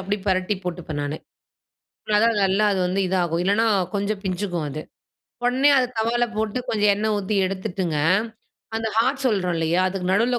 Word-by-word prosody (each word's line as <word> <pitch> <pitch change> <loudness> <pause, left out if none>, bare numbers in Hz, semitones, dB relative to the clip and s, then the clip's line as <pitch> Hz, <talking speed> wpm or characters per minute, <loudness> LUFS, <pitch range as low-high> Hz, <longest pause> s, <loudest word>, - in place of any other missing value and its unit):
அப்படி 195 +2 -2
பெரட்டி 185 +2 +1
போட்டுப்பேன் 170 -4 -4
நானு. 145 +1 -3 1.0
அதான் 230 0 +3
நல்லா 195 +2 +2
அது 190 - 0
வந்து 185 +2 0
இது 190 - 0
ஆகும். 170 0 -1
இல்லனா, 205 +4 +2 0.3
கொஞ்சொ 205 +1 0
பிஞ்சுக்கும் 180 -4 -2
அது. 155 +2 -5 0.6
உடனே 260 +4 +4
அதை 250 - +1
தவால 240 +2 +1
போட்டு, 215 +2 -1
கொஞ்சோ 210 -2 +1
எண்ணெய் 215 +1 0
ஊத்தி 200 +1 -2
எடுத்துட்டுங்க, 185 -3 -3 0.8
அந்த 225 0 -1
ஹார்ட் 265 +3 +1
சொல்றோப் 185 -6 +1
இல்லையா? 165 +2 +1
அதுக்கு 185 -1 -4
நடுவுல 240 +4 +2
195 Hz, 160 wpm, -23 LUFS, 180-220 Hz, 1.0 s, உடனே